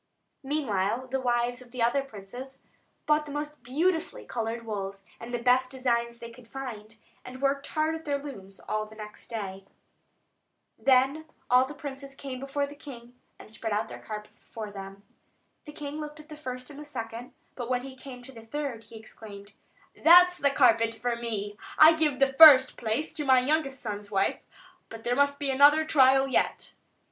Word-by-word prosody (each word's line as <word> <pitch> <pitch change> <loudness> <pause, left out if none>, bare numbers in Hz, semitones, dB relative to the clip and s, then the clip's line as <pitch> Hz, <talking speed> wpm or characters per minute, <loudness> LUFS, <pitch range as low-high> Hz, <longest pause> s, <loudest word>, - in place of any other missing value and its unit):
Meanwhile 255 -5 -1
the 265 0 -1
wives 245 0 0
of 250 - -14
the 240 -1 -2
other 240 +4 +2
princes 255 +2 -10 0.4
bought 300 0 +2
the - - -7
most 295 0 -5
beautifully 320 +7 -1
coloured 230 0 -4
wools, 195 -2 -5 0.2
and 230 +1 -8
the 240 - -1
best 255 +1 +3
designs 235 -3 -1
they 235 0 -9
could 230 0 -16
find, 225 -5 -8 0.3
and 255 +1 -10
worked 275 +1 0
hard 310 +1 0
at 320 0 -6
their 285 -1 0
looms 200 -10 -10
all 215 0 -3
the 220 - -14
next 210 -1 -10
day. 195 -4 -5 1.2
Then 270 +4 +3 0.3
all 250 +1 +6
the 295 +3 -9
princes 275 -1 -8
came 265 -2 -7
before 275 +1 -2
the 285 - -10
king, 245 -5 -12 0.2
and 215 - -15
spread 225 -1 -4
out 210 +2 -1
their - - -9
carpets 210 -1 -9
before 215 -2 -8
him. 195 0 -10 0.6
The 300 - -9
king 295 0 -6
looked 300 0 -8
at 305 +1 -14
the 305 - -8
first 255 -3 -7
and 285 - -11
the 300 - -9
second; 230 -3 -7 0.2
but 245 -2 -6
when 250 -1 0
he 265 -1 -9
came 255 -2 -11
to 270 - -11
the 230 -3 -12
third, 245 -2 -5
he 230 - -14
exclaimed: 210 -2 -11 0.4
"That's 360 +2 +6
the 280 - +3
carpet 230 -4 +3
for 240 +2 -2
me! 210 -3 -4 0.2
I 315 +1 +9
give 310 -4 +1
the 270 0 +2
first 270 -3 +9
place 235 +8 -2
to 300 - -3
my 260 -2 +5
youngest 275 0 0
son's 205 -2 -6
wife; 195 -1 0 0.5
but 225 0 -10
there 245 +1 0
must 285 +1 +2
be 280 -1 -1
another 290 +4 +6
trial 270 -2 +5
yet." 265 - -1
255 Hz, 190 wpm, -28 LUFS, 225-285 Hz, 1.2 s, I